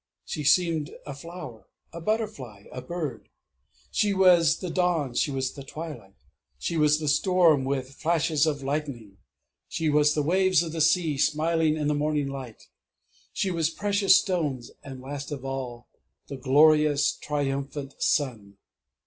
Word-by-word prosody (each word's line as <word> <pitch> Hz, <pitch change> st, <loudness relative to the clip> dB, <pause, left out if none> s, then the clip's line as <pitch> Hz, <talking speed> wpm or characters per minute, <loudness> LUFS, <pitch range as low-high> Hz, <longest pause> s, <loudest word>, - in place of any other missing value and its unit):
She 150 Hz, -, -4 dB
seemed 165 Hz, 0 st, +2 dB, 0.2 s
a 145 Hz, -, -6 dB
flower 140 Hz, -5 st, -10 dB, 0.3 s
a 170 Hz, -, -7 dB
butterfly 165 Hz, -, -3 dB
a 125 Hz, -, -6 dB
bird; 155 Hz, -9 st, -5 dB, 0.6 s
she 205 Hz, -1 st, +1 dB
was 175 Hz, -4 st, +5 dB
the 180 Hz, -3 st, -5 dB
dawn; 170 Hz, -8 st, 0 dB
she 135 Hz, -, +1 dB
was 135 Hz, -2 st, -2 dB
the 140 Hz, -, -9 dB
twilight; 135 Hz, -9 st, -9 dB, 0.4 s
she 70 Hz, -, -3 dB
was 150 Hz, -1 st, +3 dB
the 155 Hz, -, -4 dB
storm, 165 Hz, -3 st, +3 dB
with 135 Hz, -1 st, -2 dB
flashes 160 Hz, 0 st, +1 dB
of 145 Hz, -3 st, -2 dB
lightning; 135 Hz, -8 st, -4 dB, 0.5 s
she 160 Hz, -2 st, -1 dB
was 150 Hz, 0 st, +3 dB
the 150 Hz, -, +1 dB
waves 185 Hz, +1 st, +3 dB
of 165 Hz, -, -5 dB
the 160 Hz, 0 st, -3 dB
sea, 160 Hz, -2 st, +2 dB
smiling 155 Hz, +1 st, +1 dB
in 150 Hz, -1 st, -1 dB
the 150 Hz, -, +2 dB
morning 150 Hz, -1 st, 0 dB
light; 130 Hz, -5 st, -8 dB, 0.7 s
she 190 Hz, -, -1 dB
was 165 Hz, -3 st, 0 dB
precious 200 Hz, +1 st, +3 dB
stones 150 Hz, -, -2 dB
and 135 Hz, -2 st, -9 dB
last 140 Hz, +2 st, -7 dB
of 135 Hz, -2 st, -6 dB
all 130 Hz, -3 st, -5 dB, 0.4 s
the 140 Hz, -, -5 dB
glorious 150 Hz, +2 st, +4 dB
triumphant 140 Hz, -1 st, -3 dB
Sun!... 110 Hz, -9 st, -1 dB
150 Hz, 150 wpm, -26 LUFS, 135-165 Hz, 0.7 s, was